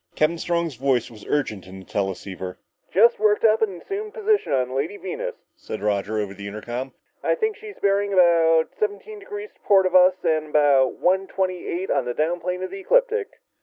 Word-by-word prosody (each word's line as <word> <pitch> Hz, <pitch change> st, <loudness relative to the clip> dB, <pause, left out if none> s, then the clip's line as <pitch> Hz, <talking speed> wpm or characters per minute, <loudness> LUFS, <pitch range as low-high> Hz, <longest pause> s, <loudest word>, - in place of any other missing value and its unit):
Captain 165 Hz, +2 st, +1 dB
Strong's 170 Hz, -2 st, -1 dB
voice 125 Hz, -2 st, 0 dB
was 110 Hz, -2 st, -13 dB
urgent 110 Hz, -10 st, -2 dB
in 95 Hz, +1 st, -10 dB
the 95 Hz, -, -13 dB
teleceiver. 95 Hz, -2 st, -4 dB, 0.3 s
"Just 230 Hz, +6 st, +5 dB
worked 210 Hz, -1 st, +2 dB
up 220 Hz, 0 st, +4 dB
an 195 Hz, -5 st, -1 dB
assumed 420 Hz, -, -6 dB
position 430 Hz, -, +1 dB
on 130 Hz, -2 st, +1 dB
the -, -, -7 dB
Lady 145 Hz, +9 st, -2 dB
Venus," 185 Hz, -1 st, -5 dB, 0.2 s
said -, -, -7 dB
Roger 105 Hz, +1 st, 0 dB
over 100 Hz, -2 st, -3 dB
the 100 Hz, +1 st, -8 dB
intercom. 120 Hz, +6 st, -5 dB, 0.3 s
"I -, -, +2 dB
think 440 Hz, -3 st, -1 dB
she's 420 Hz, -1 st, -11 dB
bearing 200 Hz, 0 st, +1 dB
about 165 Hz, -3 st, +4 dB
seventeen 430 Hz, 0 st, -3 dB
degrees 415 Hz, +1 st, -8 dB
to -, -, -34 dB
port 195 Hz, -2 st, +4 dB
of 185 Hz, -, 0 dB
us, 185 Hz, 0 st, +6 dB
and 155 Hz, -1 st, +1 dB
about 140 Hz, -4 st, +4 dB
one 190 Hz, +2 st, +1 dB
twenty 185 Hz, -2 st, -2 dB
eight 185 Hz, +3 st, -3 dB
on 125 Hz, -, +1 dB
the 120 Hz, -, -3 dB
down 165 Hz, +3 st, 0 dB
plane 180 Hz, +1 st, -3 dB
of 185 Hz, -, -5 dB
the 195 Hz, -, -6 dB
ecliptic." 460 Hz, -, +2 dB
175 Hz, 205 wpm, -23 LUFS, 130-210 Hz, 0.3 s, us